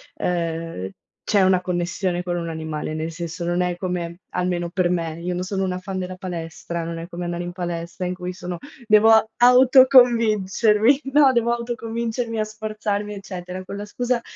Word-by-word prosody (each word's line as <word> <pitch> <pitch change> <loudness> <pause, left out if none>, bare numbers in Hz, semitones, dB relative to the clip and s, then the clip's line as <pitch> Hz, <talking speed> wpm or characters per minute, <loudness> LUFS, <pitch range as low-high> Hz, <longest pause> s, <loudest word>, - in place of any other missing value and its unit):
ehm, 165 - -2 0.4
c'è 200 -2 +3
una 185 -1 +4
connessione 175 0 -2
con 175 -1 -3
un 170 -1 -3
animale, 160 -1 -4
nel 160 +1 -3
senso 170 0 -5
non 175 +1 0
è 180 -1 -1
come 175 -1 -4
almeno 180 -1 -1
per 180 -1 +1
me, 165 -2 -2
io 180 +1 -2
non 180 - -2
sono 190 +1 -2
una 185 -1 -2
fan 190 0 -5
della 185 0 -4
palestra, 170 -2 -5
non 165 0 -5
è 165 - -7
come 175 -1 -6
andare 175 0 -3
in 175 0 -4
palestra 175 0 -4
in 180 - -1
cui 180 0 -5
sono 180 -1 -6 0.3
devo 220 +1 +5
autoconvincermi, 245 -2 +5
no, 290 -3 +6
devo 235 0 +2
autoconvincermi 235 -1 -3
a - - +2
sforzarmi, 215 -1 -4
eccetera. 185 -1 -7
Con 200 - -7
la 205 - -5
scusa 245 +2 -1
185 Hz, 175 wpm, -22 LUFS, 175-215 Hz, 0.4 s, no